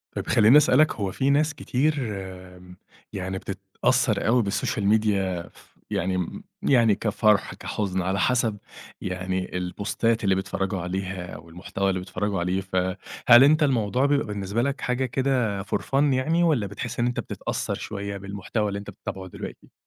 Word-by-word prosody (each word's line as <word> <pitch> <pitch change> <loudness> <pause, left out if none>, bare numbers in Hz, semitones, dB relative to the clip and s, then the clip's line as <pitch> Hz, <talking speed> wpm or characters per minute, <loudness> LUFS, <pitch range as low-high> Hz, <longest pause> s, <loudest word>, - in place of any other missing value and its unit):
طب، - - -4
خلِّيني 110 +6 +6
أسألك، 150 0 +4
هو 100 -3 -2
في 135 +8 0
ناس 150 +2 +3
كتير 150 +3 0 0.2
آمم، 90 -2 -9 0.4
يعني 95 0 -3
بتتأثَّر 100 +4 0
أوي 120 +1 +4
بالسوشيال 105 +1 -1
ميديا 100 -4 +1
ف - - -20 0.2
يعني 95 -2 0
مم 90 -2 -4 0.2
يعني 115 -6 +4
كفرح، 105 -1 +2
كحزن، 95 -3 -3
على 95 +2 -1
حسب 115 0 +1 0.4
يعني، 95 0 -3
البوستات 105 +5 -1
اللي 95 -2 +3
بيتفرَّجوا 95 0 -2
عليها، 90 0 -4
والمحتوى 90 +3 -3
اللي 95 -1 0
بيتفرَّجوا 95 +1 -2
عليه. 90 +2 0
فهل 95 +6 +3
أنت 155 +3 +5
الموضوع 125 -2 +2
بيبقى 145 0 +2
بالنسبة 105 +2 -2
لك 140 +3 -1
حاجة 125 +1 0
كده 125 -5 0
for 100 - -1
fun 135 +1 0
يعني، 160 +7 +2
والّا 145 -12 +2
بتحِس 120 +4 -6
إن 120 - +2
أنت 125 - -2
بتتأثَّر - - -3
شوية 100 -1 -5
بالمحتوى 100 +2 -3
اللي 100 0 -3
أنت 100 - -9
بتتابعه 95 -1 -7
دلوقتي؟ - - -9
100 Hz, 155 wpm, -25 LUFS, 95-125 Hz, 0.4 s, خلِّيني